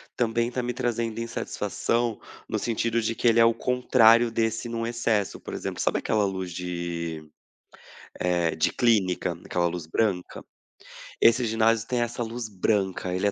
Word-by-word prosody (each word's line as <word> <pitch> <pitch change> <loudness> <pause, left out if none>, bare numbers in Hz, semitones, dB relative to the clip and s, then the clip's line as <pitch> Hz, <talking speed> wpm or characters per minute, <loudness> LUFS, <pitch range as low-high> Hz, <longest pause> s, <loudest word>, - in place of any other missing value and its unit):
também 115 0 0
tá 125 - -2
me 125 0 -2
trazendo 115 -2 -2
insatisfação, 115 0 -2 0.3
no - - -2
sentido 115 0 0
de 115 +1 -1
que - - 0
ele 115 0 +5
é 115 - +7
o 115 0 +3
contrário 120 -2 +4
desse, 115 +1 -1
num, 115 0 -3
excesso. 115 -4 -1
Por - - -9
exemplo, - - -4
sabe - - +1
aquela 105 -2 +1
luz 95 -2 -3
de, 85 -3 -4 0.9
eh, 85 -3 0
de 80 - +1
clínica? 95 -7 +2
Aquela 85 -1 0
luz 85 -1 -3
branca? 90 +1 -1 0.8
Esse 115 +2 +5
ginásio 115 0 +2
tem 125 -1 0
essa 120 +1 -3
luz 115 0 -4
branca. 95 -2 -1
Ele 95 - -1
é 100 - +3
115 Hz, 160 wpm, -26 LUFS, 90-115 Hz, 0.9 s, é